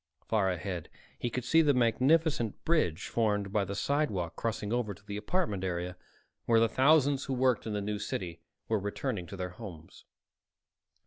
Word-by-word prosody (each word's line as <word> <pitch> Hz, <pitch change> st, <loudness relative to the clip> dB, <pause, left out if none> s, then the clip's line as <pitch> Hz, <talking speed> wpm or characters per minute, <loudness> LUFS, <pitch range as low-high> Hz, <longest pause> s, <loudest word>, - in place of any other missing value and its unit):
Far 105 Hz, -4 st, +2 dB
ahead 90 Hz, -2 st, -4 dB, 0.3 s
he 120 Hz, -, -1 dB
could 125 Hz, +2 st, -3 dB
see 160 Hz, +7 st, +5 dB
the 145 Hz, -3 st, +4 dB
magnificent 125 Hz, -, +2 dB
"bridge" 105 Hz, -, +1 dB
formed 105 Hz, -3 st, 0 dB
by 105 Hz, -, +3 dB
the 100 Hz, +2 st, -4 dB
sidewalk 105 Hz, -, 0 dB
crossing 110 Hz, -1 st, -2 dB
over 115 Hz, -5 st, -1 dB
to 100 Hz, -, -21 dB
the 100 Hz, 0 st, -5 dB
apartment 105 Hz, -, -1 dB
area, 90 Hz, -1 st, -2 dB, 0.5 s
where 115 Hz, -1 st, +5 dB
the 115 Hz, -, +5 dB
thousands 140 Hz, +2 st, +4 dB
who 135 Hz, -, -2 dB
worked 125 Hz, -3 st, +2 dB
in 110 Hz, -, -2 dB
the 105 Hz, -, -1 dB
New 105 Hz, +1 st, -2 dB
City 85 Hz, -5 st, -4 dB, 0.3 s
were 110 Hz, -1 st, +1 dB
returning 100 Hz, -2 st, -3 dB
to 100 Hz, -, -8 dB
their 90 Hz, -1 st, -4 dB
homes. 90 Hz, -5 st, -11 dB
105 Hz, 175 wpm, -31 LUFS, 95-130 Hz, 0.5 s, see